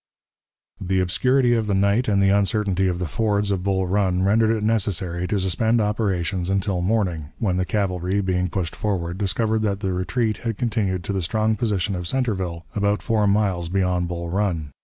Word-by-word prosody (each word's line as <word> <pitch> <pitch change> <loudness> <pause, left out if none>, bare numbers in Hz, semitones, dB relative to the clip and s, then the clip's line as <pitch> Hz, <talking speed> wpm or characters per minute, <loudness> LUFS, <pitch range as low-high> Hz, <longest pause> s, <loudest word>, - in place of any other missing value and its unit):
The 95 0 +1
obscurity 125 +7 +2
of 115 -2 0
the 100 - +1
night 100 +5 +2
and 100 -2 +3
the 95 - +4
uncertainty 100 -1 +1
of 90 -1 -1
the 90 - -2
fords 100 +5 0
of 95 -2 0
Bull 95 0 0
Run 95 -1 +1
rendered 110 +3 +3
it 110 -2 0
necessary 95 -5 0
to 105 - 0
suspend 110 +5 +1
operations 95 -4 -1
until 95 -1 0
morning, 90 -6 -1
when 95 -6 0
the 90 - 0
cavalry, 95 -1 -1
being 90 -2 0
pushed 85 -3 -3
forward, 90 -4 -2
discovered 110 +3 0
that 100 -2 -1
the 95 -3 -1
retreat 110 +4 -1
had 115 -2 -4
continued 105 -7 -1
to 100 - -3
the 95 - -1
strong 110 +6 0
position 105 -4 -1
of 90 -2 -4
Centreville, 95 -10 -2
about 100 0 0
four 110 -3 +1
miles 100 -4 +1
beyond 90 -1 0
Bull 85 0 -4
Run. 90 -7 -1
100 Hz, 185 wpm, -23 LUFS, 90-105 Hz, -, the